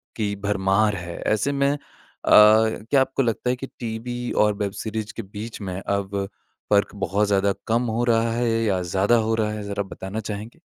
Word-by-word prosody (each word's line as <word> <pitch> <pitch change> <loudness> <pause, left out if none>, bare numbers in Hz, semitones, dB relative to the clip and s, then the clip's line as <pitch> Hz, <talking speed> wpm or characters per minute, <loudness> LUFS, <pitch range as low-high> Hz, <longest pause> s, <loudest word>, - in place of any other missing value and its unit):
की 105 -2 -1
भरमार 100 +1 +1
है। 85 -2 -6
ऐसे 110 +6 +1
में 140 0 +2
अ, 145 - -1 0.5
क्या 110 +4 +6
आपको 135 +1 0
लगता 120 +1 -1
है 125 - +2
कि 135 +2 -7
टीवी 120 +1 -4
और 105 0 +3
वेब 100 -1 -2
सीरीज़ 110 -1 -4
के - - -4
बीच 105 +3 -8
में 95 -2 -4
अब 100 0 -2 0.5
फ़र्क 100 -1 +3
बहुत 100 +1 0
ज़्यादा 100 0 +2
कम 115 +2 +2
हो 120 - +1
रहा 115 0 +3
है 120 0 0
या 95 -4 +1
ज़्यादा 95 +6 +2
हो - - +2
रहा 110 -1 0
है 105 -1 -5
ज़रा 100 0 -3
बताना 95 +2 -6
चाहेंगे? 110 +6 -7
105 Hz, 190 wpm, -23 LUFS, 100-115 Hz, 0.5 s, क्या